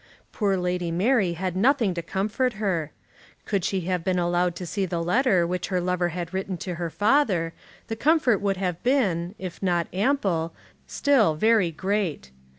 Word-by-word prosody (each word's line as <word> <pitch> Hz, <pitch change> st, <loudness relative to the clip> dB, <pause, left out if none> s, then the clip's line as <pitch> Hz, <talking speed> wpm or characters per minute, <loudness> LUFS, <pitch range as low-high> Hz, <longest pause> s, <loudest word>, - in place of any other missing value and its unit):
Poor 200 Hz, -3 st, 0 dB
Lady 180 Hz, -1 st, -1 dB
Mary 190 Hz, +2 st, +2 dB
had 180 Hz, +1 st, -3 dB
nothing 230 Hz, -1 st, +3 dB
to 170 Hz, -, -3 dB
comfort 210 Hz, +8 st, -1 dB
her. 185 Hz, -8 st, -2 dB, 0.5 s
Could 200 Hz, -4 st, -1 dB
she 190 Hz, +1 st, 0 dB
have 180 Hz, 0 st, -2 dB
been 185 Hz, 0 st, 0 dB
allowed 175 Hz, 0 st, +1 dB
to 180 Hz, -, -6 dB
see 190 Hz, +3 st, -2 dB
the 170 Hz, -1 st, -2 dB
letter 185 Hz, -1 st, +3 dB
which 180 Hz, +1 st, -2 dB
her 185 Hz, -2 st, 0 dB
lover 180 Hz, 0 st, 0 dB
had 175 Hz, +1 st, -5 dB
written 190 Hz, -1 st, -3 dB
to 180 Hz, +2 st, -5 dB
her 170 Hz, -, -1 dB
father, 205 Hz, -, +2 dB, 0.3 s
the 225 Hz, -, -4 dB
comfort 265 Hz, -4 st, +3 dB
would 200 Hz, -1 st, 0 dB
have 180 Hz, -3 st, -2 dB
been, 200 Hz, -9 st, +1 dB
if 185 Hz, -2 st, -7 dB
not 175 Hz, -3 st, +1 dB
ample, 190 Hz, -, 0 dB, 0.3 s
still 245 Hz, -, +3 dB
very 215 Hz, +1 st, +3 dB
great. 180 Hz, -, -2 dB
185 Hz, 170 wpm, -25 LUFS, 175-210 Hz, 0.5 s, nothing